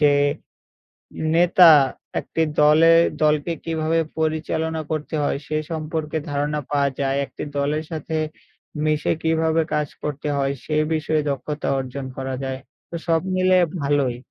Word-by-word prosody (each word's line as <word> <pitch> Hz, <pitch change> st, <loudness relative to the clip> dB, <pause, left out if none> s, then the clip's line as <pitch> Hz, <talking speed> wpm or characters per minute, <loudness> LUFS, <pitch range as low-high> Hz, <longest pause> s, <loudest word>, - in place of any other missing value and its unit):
যে 145 Hz, -1 st, +5 dB, 1.2 s
নেতা 175 Hz, 0 st, +7 dB, 0.5 s
একটি 165 Hz, -, -2 dB, 0.2 s
দলে 160 Hz, +2 st, +6 dB, 0.3 s
দলকে 150 Hz, +2 st, +2 dB
কিভাবে 165 Hz, 0 st, 0 dB, 0.2 s
পরিচালনা 160 Hz, 0 st, -1 dB
করতে 155 Hz, 0 st, -3 dB
হয়? 145 Hz, -, 0 dB
সে 155 Hz, -, -2 dB
সম্পর্কে 155 Hz, 0 st, -3 dB
ধারণা 145 Hz, +1 st, -1 dB
পাওয়া 140 Hz, -1 st, +2 dB
যায়। 135 Hz, 0 st, 0 dB
একটি -, -, -7 dB
দলের 150 Hz, +3 st, 0 dB
সাথে 160 Hz, 0 st, -4 dB, 0.7 s
মিশে 155 Hz, -1 st, +1 dB
কিভাবে 160 Hz, 0 st, +2 dB
কাজ 150 Hz, -1 st, 0 dB
করতে 150 Hz, 0 st, -4 dB
হয় 135 Hz, 0 st, 0 dB
সে 155 Hz, -, -2 dB, 0.2 s
বিষয়ে 155 Hz, -1 st, 0 dB
দক্ষতা 150 Hz, +2 st, -3 dB
অর্জন 130 Hz, +1 st, -5 dB
করা 135 Hz, 0 st, -4 dB
যায়। 130 Hz, 0 st, -3 dB, 0.3 s
তো 170 Hz, -, -4 dB
সব 165 Hz, -1 st, +3 dB, 0.2 s
মিলে 185 Hz, 0 st, +4 dB, 0.2 s
ভালোই। 140 Hz, -4 st, +1 dB
155 Hz, 135 wpm, -22 LUFS, 145-160 Hz, 1.2 s, নেতা